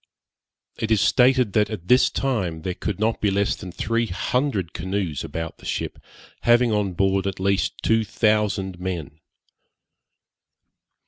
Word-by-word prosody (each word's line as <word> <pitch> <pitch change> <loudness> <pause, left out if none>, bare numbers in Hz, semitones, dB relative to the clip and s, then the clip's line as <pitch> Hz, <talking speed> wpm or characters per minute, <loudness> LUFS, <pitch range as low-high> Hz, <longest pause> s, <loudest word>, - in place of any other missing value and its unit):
It 110 - -2
is 110 -2 +3
stated 125 -3 +4
that, 105 -1 +2
at 95 -6 -7
this 125 +4 +5
time, 95 -12 -2
there 90 - -2
could 100 +1 -4
not 110 +1 0
be 105 - +3
less 100 +1 +1
than 90 - -8
three 115 +5 -1
hundred 100 - -1
canoes 95 -4 -3
about 80 0 -5
the - - -14
ship, - - -3 0.4
having 120 0 +4
on 105 -3 0
board 95 +1 +1
at 95 -1 -4
least 95 -1 0
two 115 0 +3
thousand 105 -4 0
men. 85 -5 -5
100 Hz, 145 wpm, -23 LUFS, 90-115 Hz, 0.4 s, this